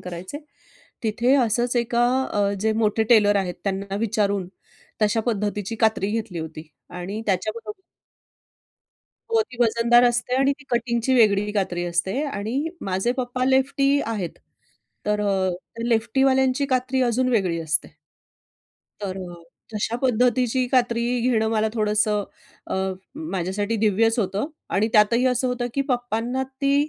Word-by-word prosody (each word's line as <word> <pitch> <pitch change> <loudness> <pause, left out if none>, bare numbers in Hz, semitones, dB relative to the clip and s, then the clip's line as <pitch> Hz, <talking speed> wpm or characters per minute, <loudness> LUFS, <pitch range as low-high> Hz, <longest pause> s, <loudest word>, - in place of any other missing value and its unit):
करायचे, 180 +9 -7 0.6
तिथे 235 +4 +2
असंच 240 0 +1
एका 240 0 +2 0.3
अ, 205 -1 +1
जे 220 +1 +2
मोठे 220 0 +1
टेलर 205 -3 +5
आहेत 180 -3 -1
त्यांना 195 0 -2
विचारून 200 -3 0 0.5
तशा 215 +2 +2
पद्धतीची 210 -1 -2
कात्री 220 -3 +1
घेतली 220 -5 -3
होती. 160 -1 -7 0.2
आणि 180 +5 -5
त्याच्याबरोबर 215 - -2 1.5
हो, 455 -1 +3
ती 250 - -14
वजनदार 235 +1 +4
असते. 240 +1 +1
आणि 270 +1 +3
ती 290 - -16
कटिंगची 235 +1 +1
वेगळी 210 -3 +4
कात्री 180 -4 -1
असते. 175 - -1
आणि 265 +5 -2 0.2
माझे 190 +7 +1
पप्पा 255 0 -1
लेफ्टी 275 +2 +2
आहेत. 205 -7 -4 0.7
तर 210 0 +1
अ, 195 -2 +1
त्या 230 +6 -7
लेफ्टीवाल्यांची 265 +3 +2
कात्री 260 0 0
अजून 250 +1 +1
वेगळी 185 -8 +1
असते. 155 -1 -1 1.0
तर 195 -2 -4
अ, 170 -1 -12 0.3
तशा 220 +3 -1
पद्धतीची 250 +1 +2
कात्री 240 -2 +2 0.2
घेणं 225 -3 +2
मला 220 -1 +1
थोडंसं 210 -1 +1 0.4
अ, - - -3 0.6
माझ्यासाठी 195 +4 -1
दिव्यच 225 +2 +2
होतं 200 +4 -1 0.3
आणि 210 +3 +2
त्यातही 230 +4 +4
असं 255 0 +1
होतं 245 -1 -2
की 275 - +1
पप्पांना 245 0 -1 0.2
ती 275 0 +2
225 Hz, 135 wpm, -23 LUFS, 200-245 Hz, 1.5 s, टेलर